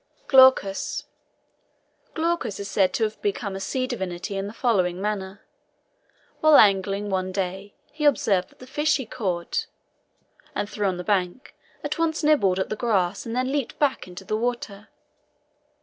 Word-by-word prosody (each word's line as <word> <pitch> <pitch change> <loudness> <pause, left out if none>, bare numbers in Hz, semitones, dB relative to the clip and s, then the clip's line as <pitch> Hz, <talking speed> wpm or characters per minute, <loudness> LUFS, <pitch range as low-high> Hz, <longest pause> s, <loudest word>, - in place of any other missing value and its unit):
GLAUCUS. 260 -7 +4 1.1
Glaucus 335 - -1
is 200 - -5
said 190 -2 +2
to 225 - 0
have 215 0 -2
become 200 -1 -2
a - - -4
sea 255 +7 -2
divinity 190 -5 -4
in 195 0 -2
the - - -6
following 190 -7 +1
manner. 200 -1 -4 1.0
While 310 -1 +6
angling 200 0 +3
one 185 0 -1
day, 190 +1 -4 0.2
he 300 0 -3
observed 200 -10 +2
that - - -24
the 255 - -12
fish 295 +4 +1
he 265 - -5
caught 190 -8 -3 0.9
and - - -1
threw 205 -1 -2
on 185 -2 -1
the 180 - -5
bank, 190 +4 -1 0.3
at - - -3
once 325 -1 0
nibbled 215 -12 +3
at 190 - -1
the - - -2
grass 200 -4 0
and 230 - -4
then 255 +1 0
leaped 280 -3 -2
back 280 -8 0
into 180 +1 -10
the 215 - -1
water. 220 -3 -3
205 Hz, 165 wpm, -24 LUFS, 190-255 Hz, 1.1 s, While